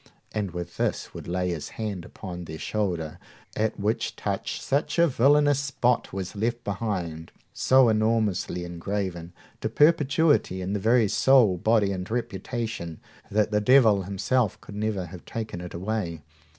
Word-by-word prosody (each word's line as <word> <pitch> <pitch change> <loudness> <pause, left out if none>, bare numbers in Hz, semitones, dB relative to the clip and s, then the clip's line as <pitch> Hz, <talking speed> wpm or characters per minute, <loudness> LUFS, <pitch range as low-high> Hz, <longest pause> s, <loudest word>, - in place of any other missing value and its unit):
And 105 -3 -2
with 85 -1 -7
this - - -1
would - - -8
lay 90 +1 -1
his 85 -4 -4
hand 105 -6 -4
upon 90 -2 -8
their 80 0 -7
shoulder, 85 -6 -2 0.4
at 110 0 -1
which 105 +3 -1
touch - - -3
such 140 +5 -1
a 170 - +6
villainous 145 0 +4
spot 130 -3 0
was 95 +1 -5
left 120 +3 -1
behind, 95 -6 -3 0.2
so 130 -1 +5
enormously 110 -5 +1
engraven 85 0 -4 0.3
to 110 - -2
perpetuity 150 - +3
in 95 +2 -3
the 105 - 0
very 115 +2 +4
soul, 120 -3 +5
body, 105 +2 +2
and 90 -1 -4
reputation, 115 -6 -4 0.3
that 105 +1 +1
the 105 0 +2
devil 110 -4 +5
himself 100 +4 0
could - - -12
never 105 -3 -1
have 85 0 -10
taken 110 -6 -5
it 90 -1 -8
away. 90 -4 -3
105 Hz, 150 wpm, -26 LUFS, 90-115 Hz, 0.4 s, a